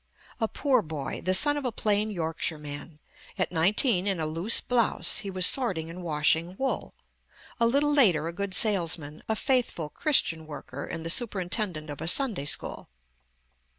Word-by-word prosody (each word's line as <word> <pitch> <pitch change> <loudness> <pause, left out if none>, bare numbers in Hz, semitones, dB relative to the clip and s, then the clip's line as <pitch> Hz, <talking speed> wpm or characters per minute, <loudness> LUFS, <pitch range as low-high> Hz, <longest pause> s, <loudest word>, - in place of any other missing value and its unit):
A 225 - +1
poor 270 +3 +1
boy, 150 -3 -6
the 185 0 +3
son 290 +7 +5
of 290 - -4
a 250 - -1
plain 210 -1 0
Yorkshire 165 -4 -2
man, 150 +1 -8 0.4
at 185 - -1
nineteen 190 - +3
in 195 -4 -1
a 160 - -1
loose 165 +8 +2
blouse 240 -2 +1
he 200 - -5
was 185 -1 +2
sorting 180 -12 0
and 180 +2 -9
washing 165 +2 +1
wool; 265 0 -3 0.6
a 230 - +4
little 285 +4 +2
later, 180 - +4
a 170 - -5
good 200 +1 -3
salesman, 170 -8 +1
a 220 - +1
faithful 235 - 0
Christian 165 - +1
worker 140 -2 -8
and 165 -1 -6
the 165 - +1
superintendent 185 - -3
of 145 - -8
a 160 - -4
Sunday 215 - +2
school. 145 - -3
180 Hz, 170 wpm, -27 LUFS, 160-225 Hz, 0.6 s, son